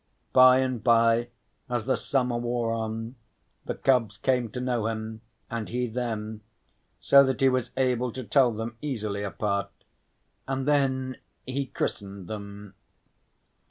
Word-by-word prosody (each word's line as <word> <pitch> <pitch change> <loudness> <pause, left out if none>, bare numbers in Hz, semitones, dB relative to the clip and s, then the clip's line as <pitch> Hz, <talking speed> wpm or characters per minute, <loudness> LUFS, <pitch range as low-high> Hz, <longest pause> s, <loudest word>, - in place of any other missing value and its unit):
By 130 0 +7
and 130 -3 -2
bye, 115 0 +4 0.4
as 120 -3 -1
the 130 - +2
summer 125 -3 0
wore 120 -1 -1
on, 115 +2 -4 0.5
the - - -3
cubs 115 -6 +2
came 125 +2 +1
to 125 - -6
know 120 -3 0
him, 110 0 -4 0.3
and 115 -2 -4
he 125 +1 -1
them, 110 -2 -4 0.6
so 140 0 +7
that 130 -2 0
he 135 - +6
was 130 -2 0
able 125 -2 +1
to 130 - -5
tell 125 +3 +4
them 110 +1 -5
easily 110 -8 -3
apart, 100 +1 -2 0.8
and 135 0 -2
then 130 -3 +1 0.3
he 135 +1 -2
christened 100 -6 -4
them. 100 -1 -8
120 Hz, 140 wpm, -27 LUFS, 110-130 Hz, 0.8 s, By